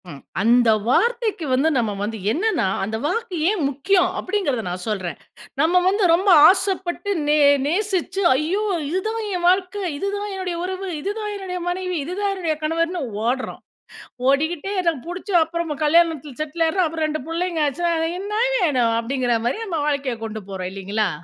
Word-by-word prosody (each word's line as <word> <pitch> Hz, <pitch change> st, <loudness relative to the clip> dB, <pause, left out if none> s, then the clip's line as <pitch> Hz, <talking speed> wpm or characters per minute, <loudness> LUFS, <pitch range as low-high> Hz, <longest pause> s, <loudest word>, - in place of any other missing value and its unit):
ம். 140 Hz, -3 st, -10 dB, 0.2 s
அந்த 235 Hz, +2 st, +4 dB, 0.2 s
வார்த்தைக்கு 455 Hz, -, +1 dB
வந்து 275 Hz, +5 st, +3 dB
நம்ம 225 Hz, -4 st, 0 dB
வந்து 220 Hz, +2 st, -3 dB
என்னென்னா, 365 Hz, -, +1 dB, 0.2 s
அந்த 220 Hz, +3 st, -2 dB
வாக்கு 455 Hz, +3 st, -2 dB
ஏன் 420 Hz, -1 st, 0 dB
முக்கியம்? 360 Hz, +7 st, +2 dB
அப்படிங்கிறத 370 Hz, -, -1 dB
நான் 180 Hz, 0 st, -5 dB
சொல்றேன், 185 Hz, -6 st, -3 dB, 0.4 s
நம்ம 350 Hz, +3 st, +4 dB
வந்து 400 Hz, +2 st, +2 dB
ரொம்ப 375 Hz, +4 st, +2 dB, 0.2 s
ஆசைப்பட்டு, 380 Hz, 0 st, -1 dB, 0.2 s
நே 300 Hz, +1 st, +4 dB, 0.3 s
நேசிச்சு 385 Hz, +3 st, -1 dB
ஐயோ! 335 Hz, +9 st, 0 dB, 0.3 s
இதுதான் 435 Hz, +7 st, -2 dB, 0.2 s
என் 350 Hz, -1 st, -2 dB
வாழ்க்கை, 380 Hz, +2 st, 0 dB
இதுதான் 405 Hz, +4 st, -3 dB
என்னுடைய 370 Hz, -2 st, -3 dB
உறவு, 375 Hz, +1 st, -4 dB
இதுதான் 420 Hz, +4 st, -3 dB
என்னுடைய 375 Hz, -2 st, -5 dB
மனைவி, 365 Hz, 0 st, -2 dB
இதுதான் 395 Hz, +5 st, -2 dB
என்னுடைய 335 Hz, -5 st, -1 dB
கணவர்ன்னு 335 Hz, +3 st, 0 dB, 0.2 s
ஓடுறோம், 255 Hz, +2 st, -2 dB, 0.7 s
ஓடிக்கிட்டே 315 Hz, +6 st, 0 dB
எனக்கு 335 Hz, -7 st, 0 dB
புடிச்ச 360 Hz, +4 st, -7 dB
அப்புறமா 325 Hz, -1 st, -3 dB
கல்யாணத்தில 305 Hz, -4 st, +2 dB
செட்டில் 310 Hz, +2 st, -1 dB
ஆயிடுறோம், 355 Hz, +1 st, +1 dB
அப்புறம் 320 Hz, 0 st, -2 dB
2 310 Hz, -1 st, -3 dB
புள்ளைங்க 335 Hz, 0 st, -1 dB
ஆச்சா, 290 Hz, +5 st, -2 dB, 0.2 s
"அ -, -, -2 dB
என்னா 420 Hz, +3 st, -2 dB, 0.2 s
வேணும்?" 255 Hz, -, +2 dB
அப்படிங்கிற 245 Hz, 0 st, 0 dB
மாரி 245 Hz, -, 0 dB
நம்ம 340 Hz, -6 st, -2 dB
வாழ்க்கைய 280 Hz, -4 st, -1 dB
கொண்டு 220 Hz, 0 st, -6 dB
போறோம் 185 Hz, -1 st, -5 dB
இல்லிங்களா? 200 Hz, +2 st, -1 dB
335 Hz, 155 wpm, -22 LUFS, 270-380 Hz, 0.7 s, அந்த